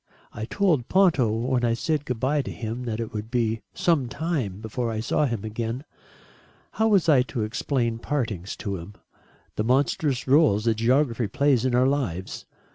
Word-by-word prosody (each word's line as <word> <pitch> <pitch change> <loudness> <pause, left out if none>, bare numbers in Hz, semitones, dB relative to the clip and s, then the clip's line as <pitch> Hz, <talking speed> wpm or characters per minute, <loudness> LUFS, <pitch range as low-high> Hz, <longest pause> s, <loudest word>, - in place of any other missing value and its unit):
I 110 - -5
told 155 - +1
Ponto 170 - +3
when 120 +3 0
I 115 -1 +2
said 150 +3 -1
good 125 -4 -3
bye 140 +4 +1
to 130 - -6
him 115 +2 -5
that 115 -2 -3
it 115 - -4
would 110 +1 -5
be 115 -2 0
some 150 -8 +1
time 140 - -2
before 115 +2 -3
I 110 - -3
saw 135 +6 +1
him 115 -5 -3
again. 115 +4 -4 0.9
How 220 - +1
was 200 -6 +3
I 145 -5 +6
to 125 -3 -3
explain 115 +1 -1
partings 115 -9 -3
to 100 -2 -4
him? 90 +4 -10 0.6
The 105 - +1
monstrous 130 +2 +1
rôle 135 -7 +4
that 115 -1 +3
geography 120 0 +2
plays 130 +2 +2
in 125 -2 +1
our 125 +1 +4
lives? 120 -11 -2
120 Hz, 180 wpm, -25 LUFS, 110-140 Hz, 0.9 s, I